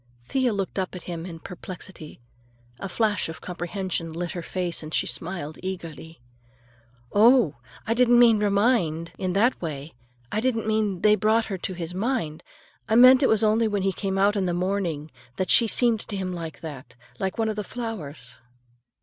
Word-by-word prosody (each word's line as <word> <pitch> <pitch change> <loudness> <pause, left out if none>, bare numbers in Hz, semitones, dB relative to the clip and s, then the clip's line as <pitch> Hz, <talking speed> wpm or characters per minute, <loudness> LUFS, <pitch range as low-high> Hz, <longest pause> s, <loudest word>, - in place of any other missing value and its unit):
Thea 260 - +1
looked 195 -1 -2
up 185 0 -3
at 180 - -8
him 170 0 -5
in 165 -2 -7
perplexity. 180 -2 -9 0.6
A 195 - -5
flash 210 -3 0
of 160 - -7
comprehension 175 -1 -4
lit 170 +2 -4
her 175 - -5
face 175 0 -3
and 155 0 -8
she - - +1
smiled 165 -4 -4
eagerly. 165 -4 -7 0.9
"Oh, 220 - +5 0.3
I 225 - +1
didn't 240 0 +4
mean 235 -3 +6
'remind' 200 -6 +1
in 185 -1 -1
that 230 +7 +2
way! 155 -2 -5 0.4
I 215 - 0
didn't 230 -3 0
mean 215 -4 0
they 210 - +6
brought 220 +1 +2
her - - -2
to 185 - -4
his 170 0 -4
mind! 195 - -2 0.5
I 220 - +3
meant 255 +3 +8
it 265 - +4
was 220 0 +3
only 220 +1 +3
when 205 -2 -1
he 195 0 +1
came 195 +1 -2
out 200 +2 +3
in 195 -2 0
the 175 - 0
morning, 175 -5 -2 0.2
that 185 - -1
she 235 - +6
seemed 235 0 +3
to 205 -1 -5
him 185 -1 -3
like 165 -2 -7
that,—like 145 +4 -7
one 225 -1 +1
of 215 - -2
the 210 - -3
flowers." 155 - -7
190 Hz, 185 wpm, -25 LUFS, 170-220 Hz, 0.9 s, meant